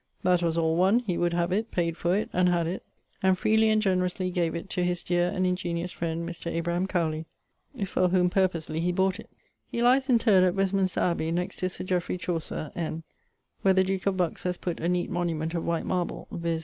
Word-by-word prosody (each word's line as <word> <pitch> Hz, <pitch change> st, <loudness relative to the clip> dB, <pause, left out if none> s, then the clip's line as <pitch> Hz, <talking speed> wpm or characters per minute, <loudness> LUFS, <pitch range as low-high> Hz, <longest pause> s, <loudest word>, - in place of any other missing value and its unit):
That 180 Hz, -1 st, +3 dB
was 170 Hz, -1 st, 0 dB
all 160 Hz, 0 st, +2 dB
one, 195 Hz, +7 st, +4 dB
he 195 Hz, -8 st, -2 dB
would 175 Hz, 0 st, +1 dB
have 170 Hz, 0 st, 0 dB
it, 215 Hz, +4 st, 0 dB
payd 170 Hz, -2 st, -1 dB
for 175 Hz, +2 st, +1 dB
it, 215 Hz, -, -3 dB
and 180 Hz, 0 st, +3 dB
had 170 Hz, -1 st, +1 dB
it, 175 Hz, +3 st, -3 dB, 0.4 s
and 190 Hz, -1 st, +3 dB
freely 220 Hz, +3 st, +3 dB
and 215 Hz, 0 st, +3 dB
generously 185 Hz, -2 st, 0 dB
gave 170 Hz, -2 st, 0 dB
it 170 Hz, +4 st, -5 dB
to 180 Hz, -, 0 dB
his 175 Hz, -1 st, -1 dB
deare 175 Hz, 0 st, +1 dB
and 185 Hz, -1 st, 0 dB
ingeniose 180 Hz, -1 st, -1 dB
friend, 170 Hz, 0 st, -3 dB
Mr. 170 Hz, 0 st, -5 dB
Abraham 170 Hz, +2 st, -1 dB
Cowley, 160 Hz, -3 st, -1 dB, 0.6 s
for 185 Hz, -1 st, +1 dB
whom 180 Hz, 0 st, +3 dB
purposely 175 Hz, -4 st, 0 dB
he 175 Hz, +2 st, +1 dB
bought 190 Hz, +2 st, +1 dB
it. -, -, -11 dB, 0.4 s
He 235 Hz, -, -2 dB
lies 260 Hz, +3 st, +4 dB
interred 225 Hz, -6 st, +5 dB
at 180 Hz, 0 st, +2 dB
Westminster 195 Hz, -1 st, +1 dB
Abbey, 170 Hz, -2 st, 0 dB
next 180 Hz, +3 st, -2 dB
to 185 Hz, -, -1 dB
Sir -, -, -5 dB
Jeffrey 180 Hz, -1 st, -1 dB
Chaucer, 165 Hz, -3 st, -3 dB
N., 165 Hz, -1 st, -3 dB, 0.6 s
where 190 Hz, -1 st, +4 dB
the 190 Hz, -, +5 dB
duke 190 Hz, 0 st, -2 dB
of 195 Hz, -1 st, +1 dB
Bucks 175 Hz, -3 st, -1 dB
has 180 Hz, -1 st, -2 dB
putt 175 Hz, -2 st, -4 dB
a 170 Hz, -, -1 dB
neate 180 Hz, -1 st, 0 dB
monument 165 Hz, -2 st, -1 dB
of 170 Hz, -, -2 dB
white 170 Hz, -1 st, -1 dB
marble, 180 Hz, -2 st, -2 dB
viz. 170 Hz, -1 st, -2 dB
180 Hz, 220 wpm, -27 LUFS, 170-190 Hz, 0.6 s, interred